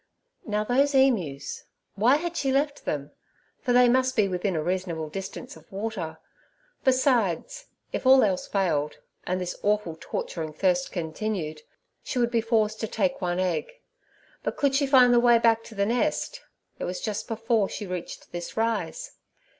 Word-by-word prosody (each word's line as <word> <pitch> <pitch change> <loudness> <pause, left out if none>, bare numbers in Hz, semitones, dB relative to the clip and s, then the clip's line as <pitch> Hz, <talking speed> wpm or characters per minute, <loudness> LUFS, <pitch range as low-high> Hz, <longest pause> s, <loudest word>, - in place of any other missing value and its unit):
Now, 210 0 0
those 275 +5 +2
emus—why 215 - +1
had 340 +3 -2
she 275 -4 0
left 285 +2 0
them? 145 -1 -3 0.5
for 250 - -1
they 245 0 +6
must 260 +1 +2
be 210 -3 +3
within 185 0 -1
a 155 - -1
reasonable 175 -3 -2
distance 190 +5 -7
of 160 0 -18
water. 195 -5 -4 0.7
Besides, 255 - +1 0.3
if - - -1
all 265 0 +8
else 190 -4 0
failed, 160 -7 0 0.3
and 185 +1 0
this 180 -1 -3
awful 205 -5 0
torturing 160 -2 -4
thirst 180 +2 +1
continued, 160 -2 -3 0.4
she - - -5
would 240 -1 +2
be 230 -1 +2
forced 220 -1 +1
to 220 - -2
take 275 +3 -1
one 175 -1 -1
egg; 185 - -1 0.7
but - - -3
could 280 -2 +2
she 280 +1 +2
find 255 -3 +6
the 240 - +6
way 240 -1 +6
back 230 -1 +3
to 220 - -11
the 200 0 +1
nest? 300 - -1 0.4
it - - -2
was 180 - -3
just 215 -2 -3
before 225 -2 +1
she 210 - -5
reached 180 -2 -6
this 175 +3 -6
rise. 230 - -1
215 Hz, 165 wpm, -26 LUFS, 180-250 Hz, 0.7 s, all